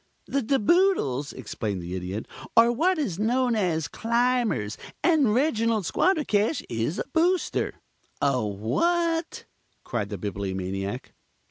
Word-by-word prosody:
"The 275 - 0
De 270 +4 +1
Boodles," 210 - +2
explained 105 -5 -4
the 85 +1 -6
Idiot, 95 +3 -4 0.3
"are 230 +1 +7
what 345 +10 +2
is 200 - -2
known 245 +2 +2
as 165 -7 0
Climbers, 235 - 0 0.3
and 310 -10 +4
Reginald 230 -6 +2
Squandercash 295 - +1
is 115 - -2
a - - -1
Booster." 350 +2 +1 0.4
"A 135 -4 +2
what?" 330 - 0 0.4
cried 105 -4 -3
the 105 - -4
Bibliomaniac. 95 +3 -4
210 Hz, 120 wpm, -26 LUFS, -, 0.4 s, are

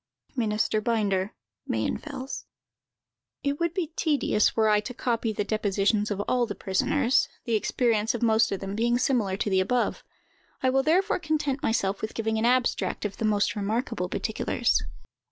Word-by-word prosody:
"MINISTER 215 -2 +1
BINDER, 205 -4 0 0.3
Mayenfels." 260 - -3 1.0
It 280 0 -1
would 340 -1 +1
be 340 -5 -2
tedious, 290 -9 +2
were 220 -1 +3
I 210 -1 +4
to 225 +4 -6
copy 230 -2 -1
the 205 - -1
depositions 210 0 +1
of 205 -1 -2
all 245 +3 +1
the 205 - -5
prisoners, 240 +7 +1 0.2
the 235 - -1
experience 225 0 +1
of 240 - -3
most 225 0 +4
of 195 - -3
them 195 0 -4
being 240 +2 +2
similar 230 -7 +1
to 210 - -2
the 190 - +4
above. 240 +6 0 0.6
I 260 - +4
will 270 +1 +3
therefore 360 +9 +2
content 305 -4 -1
myself 200 -3 0
with 220 - -4
giving 220 -1 0
an 225 - +1
abstract 250 -3 +1
of 200 - -4
the 225 - -1
most 205 -2 +2
remarkable 215 -2 -2
particulars. 220 - 0
225 Hz, 165 wpm, -27 LUFS, 205-255 Hz, 1.0 s, I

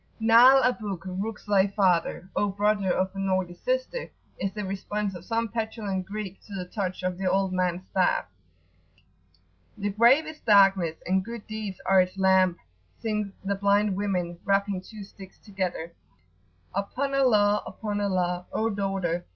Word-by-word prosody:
[p.83]"Na'al 240 +4 +7
abuk[FN#17] 195 -7 -2
rucse 220 +1 -5
thy 200 -2 +3
father 185 -3 +1
O 205 - +2
brother 200 -1 +1
of 190 +1 0
a - - -5
naughty 190 -2 0
sister!" - - -2 0.3
is 195 - -1
the 210 -1 -4
response 200 +1 -3
of 175 -2 -9
some 230 +2 -1
petulant 220 -4 -3
Greek 200 -2 -6
to 205 - -10
the 180 -2 -4
touch 185 -1 -4
of 185 0 -2
the 190 -1 0
old 190 0 +1
man's 180 0 -1
staff. 185 -2 +2 1.5
"The 205 0 -2
grave 240 +9 +5
is 310 0 -9
darkness, 195 -6 +4
and 190 +1 +1
good 230 +1 -8
deeds 215 -3 -6
are 190 -1 +5
its 185 +1 -3
lamp!" 190 -2 +3 0.4
sing 210 -3 -2
the 200 - +1
blind 200 0 +2
women, 180 -4 -2
rapping 200 -1 +1
two 210 +1 -10
sticks 195 -1 -14
together: 185 -5 -4 0.8
"upon 255 +8 -2
Allah! 210 -6 +3
upon 205 -2 -4
Allah! 180 -2 -1
O 225 +1 0
daughter!" 195 -4 -2
195 Hz, 155 wpm, -26 LUFS, 185-215 Hz, 1.5 s, p.83]"Na'al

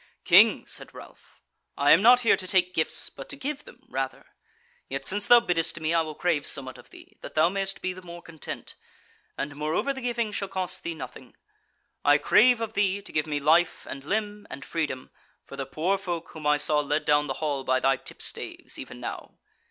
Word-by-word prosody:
"King," - - +6
said - - -3
Ralph, - - -15 0.4
"I 145 +1 +4
am 175 - +7
not 245 +3 +7
here 230 - +5
to 185 - -6
take 180 -1 +2
gifts 160 -2 0
but - - -10
to - - -5
give 290 +1 -5
them 250 - -16
rather: 135 -1 -4 0.6
yet 135 0 -3
since 205 +1 +1
thou 240 - +9
biddest 170 -6 0
me 160 +1 -1
I 165 - +4
will 155 -1 -5
crave 165 -4 0
somewhat 130 -2 -2
of - - -16
thee, - - -16
that - - -9
thou 160 +2 +4
mayst 195 0 -1
be 185 - -1
the 185 - -11
more 175 -1 -10
content: 160 -2 -7 0.6
and 145 +1 -4
moreover 155 - -1
the 265 - -8
giving 235 -3 -1
shall 200 -1 -3
cost 185 -2 -4
thee 170 -1 -4
nothing: 160 - -10 0.7
I 145 0 +6
crave 245 - +4
of 225 -1 -3
thee 200 -1 +1
to 200 - -10
give 150 0 0
me 150 -1 -1
life 165 +4 +2
and 135 0 -7
limb 205 +4 -3
and 140 +2 -8
freedom 150 -6 -3 0.3
for - - -10
the 135 - -5
poor 180 +8 0
folk 175 -4 -4
whom 155 -2 -6
I 150 0 +4
saw 150 0 +3
led 150 +1 -1
down 150 0 +3
the 135 - -2
hall 145 -3 -2
by 130 0 +2
thy 135 0 +2
tipstaves, - - -6
even - - -8
now. - - -7
170 Hz, 210 wpm, -26 LUFS, 150-200 Hz, 0.7 s, thou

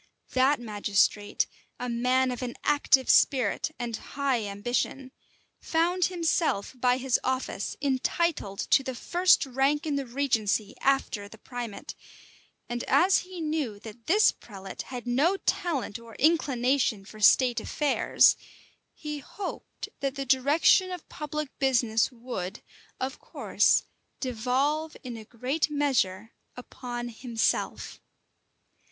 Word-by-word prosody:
That 260 +2 +3
magistrate, 205 -2 +1 0.3
a 250 - -3
man 250 +2 +1
of 245 - -5
an 245 -1 -4
active 285 -2 +3
spirit 255 -4 +3
and 240 -2 -3
high 265 -3 -2
ambition, 240 +6 -2 0.5
found 345 +2 +1
himself 330 - 0
by 250 0 +2
his 260 -1 +1
office 255 -6 -2
entitled 270 - 0
to - - +6
the 260 -1 -5
first 355 +7 +3
rank 270 +3 +1
in 295 -2 -1
the 275 -2 -3
regency 230 -5 0
after 265 -6 +1
the 220 - -13
primate; 240 -2 -7 0.7
and 240 0 -3
as 355 +8 +4
he 365 -1 -9
knew 300 -9 -2
that 225 +1 -12
this 420 +6 +5
prelate 195 -3 -9
had 250 -2 -7
no 285 +11 +2
talent 280 - -1
or 230 -1 -13
inclination 260 -8 +2
for 215 +2 -12
state 245 +3 +5
affairs, 295 -3 +3 0.6
he 300 -1 -5
hoped 390 +7 -7
that 275 -1 -2
the 275 -1 -3
direction 285 +8 +4
of 360 -3 -7
public 300 -1 -4
business 240 -5 +2
would, 230 -6 -6 0.4
of 265 +1 -3
course, - - +2 0.4
devolve 265 +6 -1
in 250 -3 -6
a 225 - -8
great 260 +8 -1
measure 240 -8 0 0.2
upon 245 -1 -6
himself. 230 -1 -2
255 Hz, 125 wpm, -27 LUFS, 235-290 Hz, 0.7 s, to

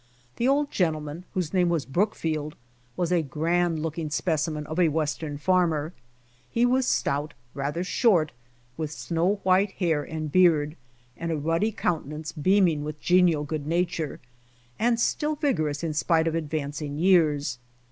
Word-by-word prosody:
The 240 - +1
old 285 +1 +2
gentleman 155 -1 -1
whose 180 -3 -2
name 180 -2 +3
was 165 -5 0
Brookfield, 155 -3 -1 0.4
was 175 -1 0
a 175 -2 +3
grand 165 +2 0
looking 160 0 -3
specimen 155 -1 -1
of 155 +4 -4
a 175 - +5
Western 150 -1 -2
farmer. 165 -2 +1 0.6
He 235 +1 +2
was 255 +1 +2
stout, 145 +2 0 0.2
rather 145 +5 -2
short, 180 -6 +2 0.5
with 155 -2 -2
snow 170 +5 0
white 190 +2 +3
hair 165 -5 0
and 155 0 -5
beard, 160 -4 +4 0.4
and 165 0 -4
a 160 - 0
ruddy 165 +8 0
countenance 155 -4 -3
beam<ing 175 -1 +3
with 150 0 -6
genial 175 -4 +3
goodsuature, 160 +1 -2 0.6
and 235 +1 +2
still 300 +5 0
vigorous 155 - -1
in 160 -2 -1
spite 160 +1 +2
of 165 - 0
advancing 150 -2 -3
years. 150 -7 +3
160 Hz, 145 wpm, -26 LUFS, 150-180 Hz, 0.6 s, a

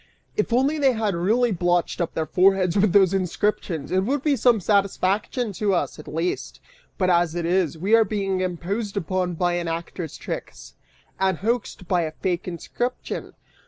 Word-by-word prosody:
If 210 - 0
only 270 +6 +2
they 270 -3 +4
had 220 -3 0
really 220 +8 +2
blotched 175 -1 0
up 170 - -2
their 160 - 0
foreheads 185 +2 +3
with 205 -1 +3
those 195 -1 +5
inscriptions, 185 -4 -1
it 185 - +3
would 270 +5 -1
be 295 -2 +3
some 240 -2 +4
satisfaction 200 +3 0
to 200 +1 +1
us, 170 - -2
at 150 - -11
least; 165 +3 -3 0.4
but 185 -2 +2
as 170 -1 +2
it 170 -1 -2
is, 175 -3 +1
we 195 +7 -1
are 225 0 +7
being 195 -2 -1
imposed 195 +4 -3
upon 185 -1 -1
by 175 +1 +1
an 175 -1 -2
actor's 165 -1 -5
tricks, 60 0 -7 0.5
and 190 -2 +2
hoaxed 220 -3 -2
by 180 -1 +2
a 160 -1 -3
fake 180 +1 -2
inscription!" 240 +8 -4
185 Hz, 175 wpm, -24 LUFS, 175-210 Hz, 0.5 s, are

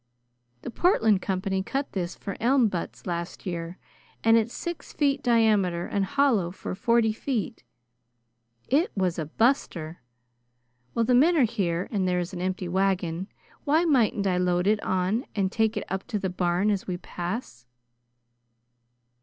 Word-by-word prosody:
The - - -5
Portland 225 - +3
company 190 0 -1
cut 270 +8 -3
this 180 -2 -3
for 200 - -6
elm 245 -1 +3
butts 175 -3 -5
last 170 +2 -4
year, 170 -1 -4 0.5
and 225 0 +6
it's 230 0 +2
six 345 +4 -6
feet 285 -2 +1
diameter 210 -8 +2
and 200 -1 -1
hollow 260 -9 +2
for 180 - -6
forty 220 +3 +2
feet. 230 -1 -3 1.0
It 300 +7 +2
was 180 -3 0
a 155 - -3
buster! 175 - 0 0.9
While 230 - +1
the 250 - +2
men 320 +8 +5
are 280 - +5
here 185 -6 -1
and 195 -4 0
there 180 0 +1
is 175 +2 -4
an 175 - -5
empty 185 0 -2
wagon, 185 -1 0 0.4
why 315 +4 +3
mightn't 235 -9 +2
I 185 -2 +2
load 180 0 +1
it 210 +1 +2
on 190 +7 0
and 195 -2 0
tak' 220 0 +1
it - - -2
up 190 0 -4
to 215 - -2
the 190 -2 -2
barn 180 +3 +1
as 200 -2 -2
we 180 -2 -2
pass?" 175 - -6
195 Hz, 160 wpm, -26 LUFS, 180-230 Hz, 1.0 s, and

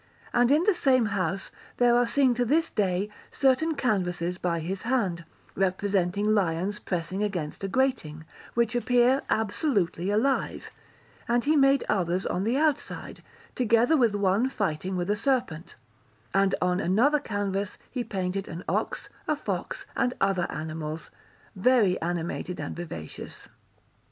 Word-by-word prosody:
And 245 0 +4
in 300 +4 +4
the 415 +2 +4
same 260 -8 +3
house 190 0 -2 0.3
there 240 -1 +4
are 245 0 +3
seen 255 +1 +3
to 245 +1 0
this 315 +7 +1
day 195 -1 0 0.2
certain 275 +4 +2
canvases 180 -8 -1
by 170 -2 0
his 185 +4 -4
hand, 200 -9 -1 0.3
representing 195 +1 +1
lions 190 +1 0
pressing 180 +2 -3
against 180 -6 -3
a - - 0
grating, 190 - -1 0.3
which 235 -1 +2
appear 245 +2 +3
absolutely 205 - 0
alive; 240 +7 0 0.6
and 240 0 +2
he 305 +2 +3
made 275 -1 +4
others 180 -1 0
on 185 +2 -1
the 235 +4 +1
outside, 305 -1 -1 0.3
together 240 +4 +3
with 235 -7 +3
one 200 +5 +2
fighting 190 - -2
with 180 +3 -1
a - - +2
serpent; 210 - -1 0.6
and 195 0 +3
on 180 0 +1
another 240 +12 +3
canvas 200 -5 -3
he 250 -2 -2
painted 195 -3 -3
an 170 +2 -7
ox, - - -2 0.2
a - - +2
fox, - - -4
and 250 - 0
other 195 -3 +1
animals, 155 0 -5 0.4
very 205 -2 +3
animated 175 +1 -3
and 145 - -4
vivacious. 150 - -8
205 Hz, 140 wpm, -27 LUFS, 180-245 Hz, 0.6 s, And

